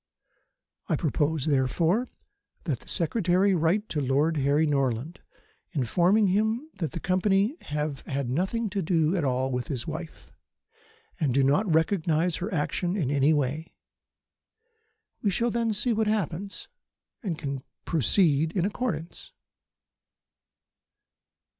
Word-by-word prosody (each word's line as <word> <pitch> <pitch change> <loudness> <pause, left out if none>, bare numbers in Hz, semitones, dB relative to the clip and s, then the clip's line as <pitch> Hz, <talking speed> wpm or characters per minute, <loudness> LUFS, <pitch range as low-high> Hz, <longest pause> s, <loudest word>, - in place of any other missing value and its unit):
"I - - +3
propose, 155 -2 0
therefore, 160 - +1 0.5
that - - -2
the - - -18
Secretary 185 +2 +2
write 180 +5 +1
to 150 - -1
Lord 145 +4 +1
Harry 145 +3 +2
Norland, 135 +1 -1 0.5
informing 175 - +3
him 220 +10 0
that 160 -7 -2
the - - -3
Company 195 - +2
have 150 -1 -2
had 140 -2 -2
nothing 185 - -1
at - - 0 0.6
all 130 -1 0
to - - -4
do - - -1
with 125 - -3
his 125 -5 -3
wife, 160 +1 -7 0.9
and 140 -7 +1
do 135 - +4
not 155 +9 +2
recognise 160 0 +1
her 190 +4 -4
action 175 +3 -1
in 145 -8 0
any 145 +1 +3
way. 150 +2 -1 1.5
We 205 - +2
shall 230 +5 0
then 230 -1 0
see 225 +3 +1
what 220 0 +1
happens, 200 -2 -2 0.5
and 180 -8 -3
can 140 -4 -4 0.2
proceed 160 - +2
in 180 - +2
accordance." 205 - -4
165 Hz, 130 wpm, -27 LUFS, 145-200 Hz, 1.5 s, do